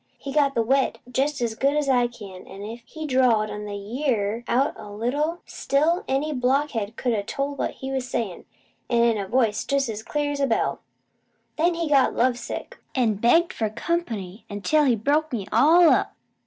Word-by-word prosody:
He 275 - -7
got 285 -2 +2
the 230 -1 +1
`wet' 270 +2 +2 0.2
jest 270 +2 0
as 230 -2 -1
good 275 +5 +1
as 300 -1 0
I 250 -2 +3
can, 200 -6 -11
an', 195 +1 -9
if 230 +3 -7
he 315 -1 -7
drawed 250 -6 +3
the - - -5
`ye 210 +7 -4
ar' 215 +1 -1
out 265 +4 +2
a 210 - -10
little, 285 +11 -2
still 320 +6 0
any 285 +3 0
blockhead 250 -4 0
could 245 -1 -1
a 210 - 0
told 275 +7 -4
what - - 0 0.2
he 265 - -3
was 260 -2 -3
sayin', 205 -9 -3 0.4
an' 235 -1 +3
in 230 -2 +3
a 195 - -4
voice 225 -2 +1
pretty 275 -5 0
an' 210 - -6
clear 295 -1 -1
as 285 - -4
a 275 - +2
bell. 225 - 0 0.8
Then 340 +2 +2
he 335 -1 -2
got 280 -3 +3
love 245 0 +2
sick, 235 - -7 0.2
an' 240 -5 +2
begged 330 - +3
for 220 -2 -1
comp'ny 225 - -3
until 295 +10 +1
he 250 -4 +4
broke 295 +8 +1
me 220 -6 -3
all 320 +9 +6
up. - - +1
250 Hz, 200 wpm, -24 LUFS, 220-285 Hz, 0.8 s, all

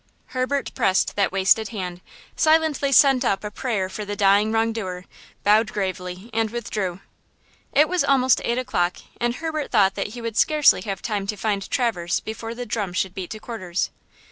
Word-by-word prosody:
Herbert 260 +2 -1
pressed 190 -7 +1
that 200 -1 +1
wasted 195 +3 +3
hand; 180 -5 -5 0.3
silently 310 -3 +2
sent 270 -1 +6
up 200 -5 0
a 210 - -5
prayer 210 -5 -2
for 210 +3 -6
the 205 0 -4
dying 200 +2 +4
wrong 225 0 +1
doer, 185 -5 -5 0.4
bowed 215 +2 +4
gravely 185 +1 -4
and 225 0 +1
withdrew. 210 -5 -4 0.7
It 300 +2 +4
was 365 +1 +1
almost 260 -2 +3
eight 235 - 0
o'clock, 180 -9 0 0.2
and 240 0 -1
Herbert 315 -1 -3
thought 195 -4 +4
that - - -3
he - - -6
would 230 -1 -4
scarcely 300 -10 +4
have 195 -1 -5
time 205 -4 -2
to 210 - -3
find 200 -2 -2
Traverse 180 -9 0
before 225 +1 -6
the 245 +1 -5
drum 205 -7 -3
should 185 0 -1
beat 185 -2 -6
to 215 - -7
quarters. 190 -6 -3
215 Hz, 180 wpm, -23 LUFS, 195-245 Hz, 0.7 s, sent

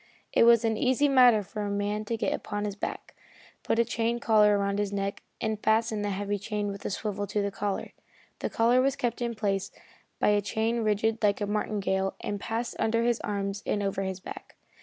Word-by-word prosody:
It - - +5
was 235 0 +6
an 220 -1 +1
easy 260 +5 +3
matter 250 -6 +6
for 210 +2 -6
a 205 - -2
man 205 +1 -1
to 230 +2 -2
get - - 0
upon 205 0 -3
his 205 -1 -3
back, - - -5 0.5
put - - 0
a 235 - +4
chain 230 +1 -1
collar 210 -3 +4
around 200 0 0
his 205 -1 -1
neck, 200 0 -3 0.2
and 220 -1 -2
fasten 220 -1 +2
the 205 - -1
heavy 205 +1 -2
chain 205 0 -2
with 200 0 -7
a - - 0
swivel 205 0 -3
to 210 - -1
the 200 0 0
collar. 200 0 -3 0.5
The - - -2
collar 240 +3 +3
was 270 +1 +2
kept 245 -3 -2
in 235 -1 -1
place 195 -3 -1 0.5
by - - +3
a 205 0 +3
chain 220 +4 -1
rigged 220 +1 +1
like 205 -2 +2
a 205 - 0
martingale 200 -2 -1
and 205 - -4
passed 230 +3 -3
under 230 +1 +2
his 240 -1 +1
arms 200 -1 -3
and 205 - -1
over 195 0 -1
his 190 -1 -3
back. - - -10
210 Hz, 215 wpm, -28 LUFS, 200-230 Hz, 0.5 s, was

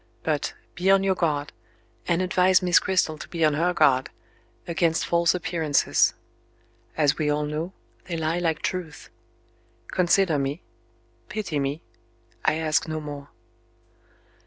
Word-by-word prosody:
But, 150 0 -1 0.2
be 180 +4 0
on 195 0 +5
your 195 -1 +2
guard, 150 -5 -1 0.5
and 175 +2 +1
advise 185 0 +3
Miss 180 -1 +5
Cristel 180 -5 0
to - - -8
be 165 -2 0
on 155 - +3
her 170 +4 +1
guard, 140 -6 +3 0.6
against 170 -1 +1
false 170 +1 +2
appearances. 160 -5 +1 0.8
As 150 -1 +2
we 150 -1 +1
all 150 0 +1
know, 155 +4 -3 0.3
they 170 -2 -4
lie 160 +2 -1
like 165 -3 -1
truth. 180 -5 -4 0.8
Consider 180 -3 +2
me. 140 +4 -3 0.7
Pity 190 -7 -3
me. 140 +3 -3 0.6
I - - +2
ask 155 -1 0
no 155 0 -3
more." 145 -2 -8
160 Hz, 135 wpm, -25 LUFS, 150-180 Hz, 0.8 s, on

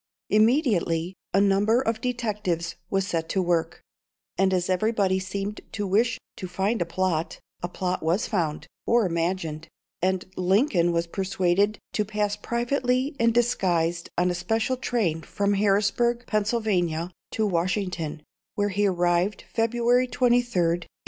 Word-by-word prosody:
Immediately 210 - +2 0.2
a 195 - +3
number 200 +4 +3
of 225 -3 -1
detectives 210 -9 -2 0.2
was 195 -1 +1
set 165 -4 -2
to 195 - 0
work; 170 -2 0 0.5
and 190 0 +2
as 180 -1 +1
everybody 190 0 +1
seemed 195 +2 -4
to 205 - -2
wish 225 +5 +2 0.2
to 185 - -5
find 195 +5 -1
a 170 - 0
plot, 170 -2 -1 0.2
a 175 - -2
plot 180 0 -2
was 170 +6 +1
found, 165 -8 -1 0.2
or 235 -2 +4
imagined, 165 -2 -2 0.3
and 185 0 0
Lincoln 185 - +2
was 170 0 0
persuaded 190 +3 +1 0.2
to 210 - +1
pass 210 0 -1
privately 250 +3 -1
and 230 0 +4
disguised 175 -8 +1
on 180 +1 +2
a - - -1
special 225 +8 0
train 220 -11 -1
from 200 +5 -1
Harrisburg, 210 +4 +2
Pennsylvania, 200 -6 0 0.2
to 220 - +1
Washington, 180 -4 -1 0.3
where 205 0 +1
he 205 +1 +1
arrived 175 +2 +1
February 240 +2 +2
23rd, 245 - -9
1861. 235 -9 +2
195 Hz, 140 wpm, -25 LUFS, 175-225 Hz, 0.5 s, or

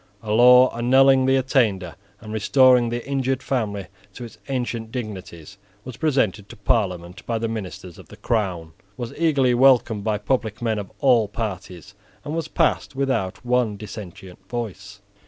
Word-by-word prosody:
A 105 - -4
law 125 +3 +6
annulling 130 +2 +4
the 135 - +4
attainder 110 - 0 0.3
and 110 -1 -8
restoring 125 +2 +4
the 120 +1 -5
injured 135 -1 -1
family 105 -7 -2 0.3
to 125 - -8
its 115 - -13
ancient 120 -4 -3
dignities 100 - -8 0.3
was 130 -2 -8
presented 115 - 0
to - - -10
Parliament 95 -3 -2
by 115 - -1
the 115 +1 -2
ministers 95 -5 -7
of - - -14
the - - -13
crown, 95 -8 -2 0.3
was 120 -2 -6
eagerly 140 -6 +2
welcomed 120 -4 +3
by 110 -1 0
public 110 -1 -2
men 110 -3 -1
of 100 - -8
all 120 -6 +4
parties, 100 -3 -6 0.3
and 150 - -4
was 165 -2 -3
passed 160 -4 0
without 130 -7 -2
one 120 -4 +1
dissentient 95 -3 -10
voice. 105 -4 -6
115 Hz, 155 wpm, -22 LUFS, 100-130 Hz, 0.3 s, law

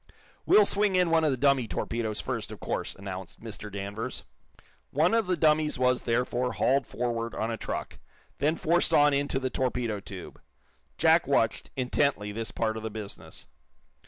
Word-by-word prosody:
"We'll 210 - +7
swing 205 -1 +2
in 180 -2 +3
one 165 -1 +4
of 155 - +3
the 130 - 0
dummy 135 -2 +3
torpedoes, 110 -1 -2
first, - - -3
of - - -8
course," - - -3
announced 95 -2 -7
Mr. 105 -2 -8
Danvers. 100 +5 -5 0.7
One 160 +7 +2
of 225 -4 +2
the 180 -1 +1
dummies 155 -1 +3
was, 125 0 +2
therefore, 125 +1 0
hauled 130 +8 +2
forward 115 -1 -2
on 110 +2 -1
a - - -1
truck, - - -5 0.4
then 150 +3 +2
forced 170 +2 +2
on 145 0 +5
into 140 -1 0
the 130 -1 -2
torpedo 125 -5 -1
tube. 95 -2 -10 0.6
Jack - - +4
watched, - - +1
intently, 130 -4 0
this 110 0 -4
part 110 +2 -1
of - - -5
the 110 - -4
business. 105 -2 -8
125 Hz, 170 wpm, -28 LUFS, 110-145 Hz, 0.7 s, We'll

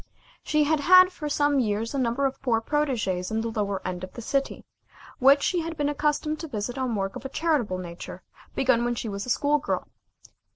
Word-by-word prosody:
She 305 0 +2
had 305 +1 +1
had 370 +4 +7
for 300 -4 -5
some 290 -1 +2
years 220 0 -1
a 275 - -1
number 255 +2 0
of 270 0 -2
poor 235 -4 +1
protégées 225 -9 -1
in 220 0 -1
the 230 0 -3
lower 200 -4 -2
end 180 0 -4
of 185 - -8
the 235 - -8
city, 275 +3 -2 0.5
which 275 +2 +5
she 360 - +1
had 330 0 -5
been 290 -1 0
accustomed 300 +1 -1
to 325 - -5
visit 240 -2 -4
on 255 -3 -1
work 195 -1 -2
of - - -7
a 270 - -5
charitable 275 - 0
nature 175 -1 -8 0.3
begun 250 -3 +2
when 240 0 0
she 225 - -4
was 200 +3 -5
a - - -5
school 290 +4 +2
girl. 290 - -3
260 Hz, 215 wpm, -26 LUFS, 220-295 Hz, 0.5 s, had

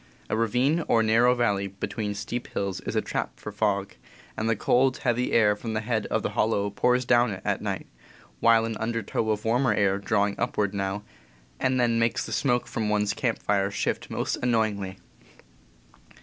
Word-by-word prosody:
A - - +2
ravine 125 +9 +1
or 115 - +3
narrow 115 +3 +4
valley 100 -5 +1
between 105 +2 -4
steep 115 +4 -4
hills 100 -2 -3
is - - -5
a - - +1
trap - - -4
for 105 - -7
fog, 100 -2 0 0.4
and 110 +1 -1
the 115 - +2
cold, 130 +5 +2
heavy 125 0 0
air 105 -2 +4
from 110 +1 -5
the 110 - -1
head 110 -1 -1
of - - -1
the - - -1
hollow 100 -2 +1
pours 125 +4 +2
down 120 0 +4
it 95 -2 -5
at - - 0
night, - - -3 0.5
while 115 -1 +5
an 115 -1 -3
undertow 115 -1 -2
of 105 0 -1
warmer 120 0 +2
air 100 -1 +2
drawing 100 -1 +1
upward 100 -1 0
now 100 +1 -2 0.6
and 130 0 +1
then 115 -1 +2
makes 115 0 +1
the - - -8
smoke 125 -3 +1
from 110 -2 -2
one's 105 -1 +1
camp - - -2
fire 100 -1 +1
shift 100 - -2
most - - -2
annoyingly. 110 -5 0
110 Hz, 185 wpm, -26 LUFS, 100-120 Hz, 0.6 s, while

